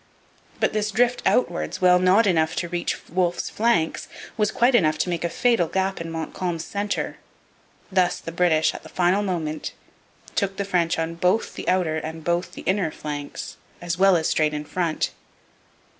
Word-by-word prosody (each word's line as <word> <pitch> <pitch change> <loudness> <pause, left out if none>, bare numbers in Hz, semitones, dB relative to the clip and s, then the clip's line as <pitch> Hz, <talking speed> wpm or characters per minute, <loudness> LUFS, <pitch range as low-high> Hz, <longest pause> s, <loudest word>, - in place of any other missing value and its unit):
But - - +1
this 215 0 0
drift 245 +4 +2
outwards, 175 -8 +1
while 180 -1 +5
not 185 +5 +5
enough 160 -5 +2
to 175 - -2
reach 175 0 -3
Wolfe's 175 0 -1
flanks, 210 -8 +1 0.3
was 210 -2 +1
quite 240 +4 +3
enough 155 -9 +3
to 180 - -1
make 170 -1 -2
a 170 - 0
fatal 230 -2 +2
gap 190 +1 -1
in 165 - -5
Montcalm's 165 +1 -3
centre. 205 0 -3 0.7
Thus 185 -2 +2
the 165 - -7
British, 165 -2 +2
at - - -8
the - - -13
final 185 +3 +2
moment, 165 -6 -3 0.6
took 195 -2 -1
the 200 - -1
French 180 -2 +1
on 165 0 -2
both 180 +6 +1
the - - -4
outer 180 -4 +1
and 160 +1 -6
both 175 +2 -1
the - - -9
inner 190 -3 +1
flanks 145 -2 -6 0.2
as 175 0 -3
well 195 -1 +6
as 160 - 0
straight 155 -1 +1
in 150 0 -4
front. 170 0 -1
175 Hz, 175 wpm, -24 LUFS, 165-195 Hz, 0.7 s, well